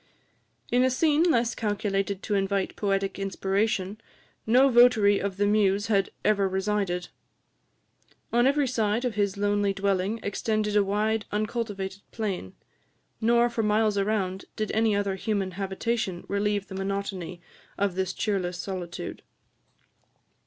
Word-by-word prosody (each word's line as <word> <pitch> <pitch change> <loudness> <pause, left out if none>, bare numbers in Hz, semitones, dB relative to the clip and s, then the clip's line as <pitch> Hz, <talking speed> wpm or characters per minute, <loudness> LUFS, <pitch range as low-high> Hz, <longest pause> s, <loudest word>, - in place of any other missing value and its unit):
In 245 +1 +4
a 260 - +4
scene 295 +4 +2
less 245 -9 +3
calculated 200 -2 -2
to 210 - -2
invite 195 -1 0
poetic 195 -1 -1
inspiration 195 +1 -1 0.5
no 255 +4 +6
votary 235 -5 +5
of 195 -1 -3
the 205 - +2
muse 205 0 +2
had 195 -1 +2 0.2
ever 200 -2 +3
resided. 190 -2 -1 1.2
On 240 +2 +4
every 280 0 +2
side 225 -1 0
of 245 - -1
his 205 -1 0
lonely 205 0 +1
dwelling 195 +2 0
extended 210 +1 -1
a 205 - +5
wild 210 +2 0
uncultivated 205 -3 -3
plain; 200 - -4 0.7
nor 235 +1 +4
for 235 -1 -2
miles 215 0 +2
around 195 -2 -1
did 215 -1 -2
any 220 -1 +2
other 200 -1 0
human 195 -1 -2
habitation 195 +1 -2
relieve 205 0 0
the - - -9
monotony 195 -2 -4 0.4
of 200 -2 +1
this 190 0 -1
cheerless 190 -4 -2
solitude. 180 -2 -5
205 Hz, 130 wpm, -27 LUFS, 195-220 Hz, 1.2 s, no